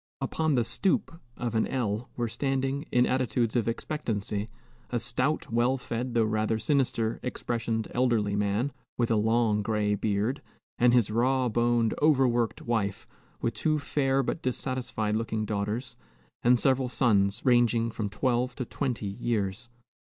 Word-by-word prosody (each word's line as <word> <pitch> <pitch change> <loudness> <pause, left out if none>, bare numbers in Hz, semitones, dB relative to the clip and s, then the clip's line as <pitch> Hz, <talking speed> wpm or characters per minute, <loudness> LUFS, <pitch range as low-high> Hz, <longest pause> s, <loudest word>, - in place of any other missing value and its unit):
Upon 160 -3 0
the 120 -2 +2
"stoop" 190 - 0 0.2
of 120 -2 -3
an 110 - +1
L 115 -3 -2
were 120 -1 0
standing, 135 +4 -1
in 125 0 +4
attitudes 120 -2 0
of 120 -2 +1
expectancy, 110 -5 -2 0.4
a 120 - 0
stout, 130 +4 -1
well 120 +3 +2
fed, 125 0 -4
though 115 - +4
rather 110 0 0
sinister 115 -2 0
expressioned 115 -2 -2
elderly 115 -5 +1
man, 105 +7 0 0.2
with 120 -1 +1
a - - +4
long 110 0 +2
gray 105 -1 0
beard, 105 +5 -1 0.4
and 120 0 +5
his 120 -4 +3
raw 125 +3 +2
boned, 120 0 +2
overworked 130 -6 +2
wife, 100 -4 -1 0.4
with - - 0
two 155 -1 +1
fair 135 -2 +1
but 160 - -3
dissatisfied 125 -4 -2
looking 110 -1 -1
daughters, 105 +4 -3 0.4
and 125 0 +4
several 130 -1 +2
sons, 105 -4 +2
ranging 120 -2 +3
from 110 -2 -3
twelve 125 +3 0
to 125 - -3
twenty 125 -4 -3
years. 105 +1 -2
120 Hz, 145 wpm, -28 LUFS, 110-130 Hz, 0.4 s, and